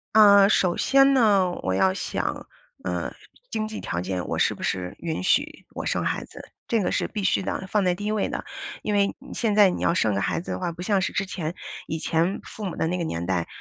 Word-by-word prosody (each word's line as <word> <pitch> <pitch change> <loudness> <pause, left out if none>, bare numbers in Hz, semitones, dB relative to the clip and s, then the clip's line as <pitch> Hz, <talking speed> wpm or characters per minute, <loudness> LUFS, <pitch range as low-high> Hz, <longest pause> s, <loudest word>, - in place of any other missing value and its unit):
呃， 200 -2 +8
首 180 -4 +2
先 275 0 +5
呢， 205 -8 +4
我 95 - 0
要 185 - +3
想， - - -3 0.4
呃， - - -3 0.4
经 215 0 -1
济 215 - -6
条 85 - -3
件， 90 0 -3
我 - - -2
是 - - +2
不 - - -9
是 90 -1 -2
允 165 -2 -3
许 290 - 0
我 - - -4
生 - - 0
孩 - - -1
子， - - -11 0.3
这 230 -3 +1
个 - - 0
是 - - 0
必 210 -2 -4
须 190 - +2
的， 190 0 -3
放 210 +1 +1
在 180 - +3
第 205 +4 -6
1 215 - 0
位 215 -2 0
的。 - - -4 0.4
因 210 - -2
为 200 0 +2 0.2
现 225 -3 0
在 205 -2 +7
你 180 - -3
要 170 - +3
生 110 - +1
个 100 - 0
孩 - - 0
子 - - -10
的 - - -3
话， 180 -2 -2
不 170 +1 -9
像 195 +1 +1
是 190 - -2
之 195 - 0
前， 170 -4 -4 0.3
以 160 - -3
前 170 +5 0
父 215 - -8
母 185 - -4
的 160 - 0
那 180 - -1
个 175 - -2
年 85 - -3
代， 90 -3 0
190 Hz, 260 characters per minute, -25 LUFS, 165-210 Hz, 0.4 s, 呃